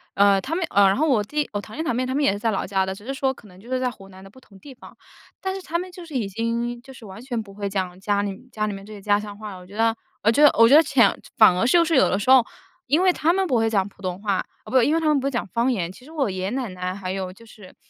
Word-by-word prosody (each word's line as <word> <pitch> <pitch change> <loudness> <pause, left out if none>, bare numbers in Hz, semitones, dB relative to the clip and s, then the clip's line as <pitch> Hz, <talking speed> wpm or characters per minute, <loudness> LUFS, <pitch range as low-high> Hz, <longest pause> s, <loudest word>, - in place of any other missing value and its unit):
呃， 200 -1 +4
他 315 +9 -3
们， 355 -1 0
呃， 200 0 +5
然 190 - +3
后 315 +2 +2
我 235 -7 +2
弟 295 +7 -2
我 205 - -2
堂 215 - -12
弟 320 - -2
堂 245 - -1
妹 255 - 0
他 260 +1 -3
们 290 - +1
也 280 - +4
是 200 - -4
在 225 - 0
老 195 - -2
家 190 0 0
的， 190 0 -4
只 205 - -14
是 270 - -3
说 270 -1 0
可 220 - -17
能 185 -1 -17
就 235 +5 -15
是 255 - 0
在 255 -1 -1
湖 195 -4 -15
南 190 0 -14
的 195 - -13
不 260 +6 -18
同 195 -5 -19
地 275 - -12
方， 250 - -15 0.5
但 380 0 -2
是 385 - -6
他 340 -2 -2
们 365 +1 -7
就 360 -1 -11
是 310 -5 -10
已 220 -6 -1
经 230 +3 -3
就 265 - -14
是 240 - -13
完 195 +2 -10
全 245 -3 -3
不 200 -2 -14
会 200 -1 -4
讲 185 -2 -3
家 200 +1 0
里 205 +6 -7
家 215 -1 -2
里 210 - -3
面 195 0 -9
这 215 - -13
些 205 - -9
家 205 0 +2
乡 205 -1 -8
话 210 -1 -8
了。 185 - -10
我 180 - -14
觉 200 +3 -12
得 225 0 +2 0.3
我 220 - +4
觉 290 +6 +3
得 295 - +8
我 230 - +8
觉 270 - +6
得 310 - +9
潜 235 -9 +3 0.2
反 215 -5 +7
而 185 +6 +1
就 335 +5 +4
是 325 -2 +1
有 260 - +5
的 185 - +1
时 205 - -3
候 260 -2 +8 0.4
因 300 +7 +3
为 370 -1 +4
他 320 - +2
们 385 0 +1
不 265 - 0
会 225 0 +2
讲 195 -3 +1
普 195 - -22
通 185 0 -4
话， 200 -3 0
啊 - - -4 0.2
不， 260 0 +3
因 290 +7 +2
为 - - +2
他 325 - -3
们 300 -2 +3
不 265 - -5
会 275 - 0
讲 240 - -3
方 235 +7 0
言， 180 -7 -2
其 250 +7 -16
实 310 - -14
我 290 -7 0
爷 185 0 -5
爷 190 - -1
奶 255 -4 -3
奶 185 0 -5
还 185 -2 -5
有 190 -1 -4
就 230 +4 -17
是 210 -4 -15
225 Hz, 375 characters per minute, -23 LUFS, 195-265 Hz, 0.5 s, 得